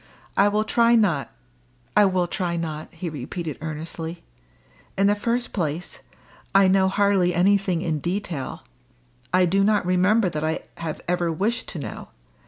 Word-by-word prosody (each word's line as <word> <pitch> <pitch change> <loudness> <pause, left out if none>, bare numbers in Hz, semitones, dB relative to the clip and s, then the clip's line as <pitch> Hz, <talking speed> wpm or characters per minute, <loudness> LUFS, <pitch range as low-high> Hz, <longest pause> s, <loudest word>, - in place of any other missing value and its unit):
I 200 - +5
will 210 +1 +1
try 235 +1 +4
not 180 -11 +2 0.7
I 210 - +7
will 185 -2 +1
try 175 -1 -2
not!" 155 -2 -5
he 175 +1 -6
repeated 155 +1 -5
earnestly. 160 +2 -6 0.7
"In 195 - +3
the 205 - +5
first 235 +4 -2
place, 170 -2 -3 0.6
I 195 -1 +7
know 190 0 +4
hardly 195 -3 +2
anything 185 -1 +2
in 160 -3 -1
detail. 175 -6 -4 0.7
I 180 +1 +4
do 195 +3 +2
not 210 -2 +2
remember 185 +4 +3
that 155 -3 -3
I 160 +1 -1 0.2
have 160 -2 -5
ever 175 -1 0
wished 215 +9 -1
to 180 - -6
know. 145 - -6
180 Hz, 155 wpm, -24 LUFS, 165-200 Hz, 0.7 s, I